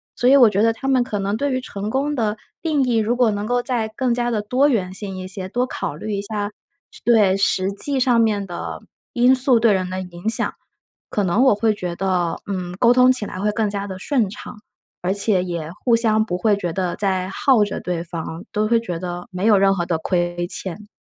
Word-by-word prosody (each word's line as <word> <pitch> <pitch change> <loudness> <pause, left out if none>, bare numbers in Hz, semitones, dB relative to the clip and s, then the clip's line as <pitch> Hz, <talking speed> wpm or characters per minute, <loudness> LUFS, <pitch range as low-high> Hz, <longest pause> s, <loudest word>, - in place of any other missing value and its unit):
所 245 - +2
以 275 - +7
我 240 -5 +7
觉 200 0 0
得 225 +1 +3
他 270 +4 -6
们 260 -2 +3
可 220 -4 -4
能 200 +2 -1
对 285 0 -1
于 255 - -1
成 205 -4 -5
功 275 +5 -1
的 220 -6 -1 0.3
定 310 -4 +1
义 245 -3 +1
如 225 +2 +1
果 245 -3 +3
能 205 0 -3
够 245 +2 0
再 235 -4 -1
更 255 -1 0
加 240 0 -1
地 220 -3 -1
多 250 +7 +2
元 190 -8 -1
性 195 0 -5
一 185 0 -6
些， 190 -2 -5
多 245 +4 0
考 255 - -5
虑 210 +7 -5
一 200 - -2
下 205 0 -3 0.5
对， 210 -5 +4
实 195 -1 +1
际 265 +7 +1
上 245 -2 +3
面 210 -3 +1
的 175 -2 -6 0.3
因 250 +1 +4
素 255 -2 +4
对 230 -1 +5
人 185 -1 -1
的 185 +1 -4
影 180 +1 -8
响， 225 - +2 0.6
可 205 - -1
能 185 +5 +1
我 260 - +5
会 215 +1 +1
觉 180 -4 -5
得， 180 -2 -1
嗯， 180 -3 -4
沟 240 -1 +5
通 250 0 +5
起 255 -5 +2
来 185 - -7
会 210 +2 0
更 215 -1 0
加 200 0 -4
地 190 - -6
顺 240 -4 0
畅， 210 - -10 0.4
而 180 +2 0
且 200 -1 +2
也 170 -3 -5
互 240 -2 +5
相 220 -2 +2
不 180 -4 -3
会 210 0 +2
觉 175 -4 -3
得 180 -1 -2
在 190 -2 -1
耗 230 +3 +3
着 - - -5
对 175 -2 -3
方， 165 0 -6
都 215 0 0
会 230 +1 +3
觉 175 -7 -5
得 175 -1 -5
没 185 +2 -3
有 215 -2 +5
任 195 0 +4
何 175 -2 -2
的 170 -2 -1
亏 175 0 -1
欠。 195 +3 0
205 Hz, 255 characters per minute, -21 LUFS, 185-235 Hz, 0.6 s, 以